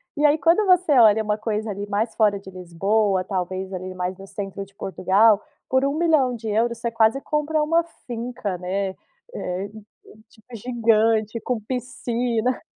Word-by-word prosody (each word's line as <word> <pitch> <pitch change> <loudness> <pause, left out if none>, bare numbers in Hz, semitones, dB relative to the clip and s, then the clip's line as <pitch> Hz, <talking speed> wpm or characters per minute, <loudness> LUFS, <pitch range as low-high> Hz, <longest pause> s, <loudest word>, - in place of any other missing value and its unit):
E 295 - -1
aí 295 +2 +3
quando 335 +7 +3
você 365 -3 +4
olha 220 -1 +6
uma 210 0 -1
coisa 215 0 -2
ali 200 +1 -5
mais 215 +3 -1
fora 210 -3 +2
de 195 - -19
Lisboa, 190 +2 0
talvez 190 0 -4
ali 185 0 -6
mais 180 +1 -3
no 195 +1 -12
centro 195 0 -6
de 195 0 -17
Portugal, 200 +4 +3 0.3
por 260 +1 +2
€1.000.000,00, 250 -7 +1
você 235 0 -3
quase 225 +3 +3
compra 300 +1 0
uma 330 +2 +2 0.2
finca, 235 -5 -4
né, 190 +2 -2 0.4
eh, 185 - -4 0.6
tipo, 230 +2 -15
gigante 225 -1 +1
com 245 -3 -2
piscina. 245 0 -2
220 Hz, 150 wpm, -23 LUFS, 195-250 Hz, 0.6 s, olha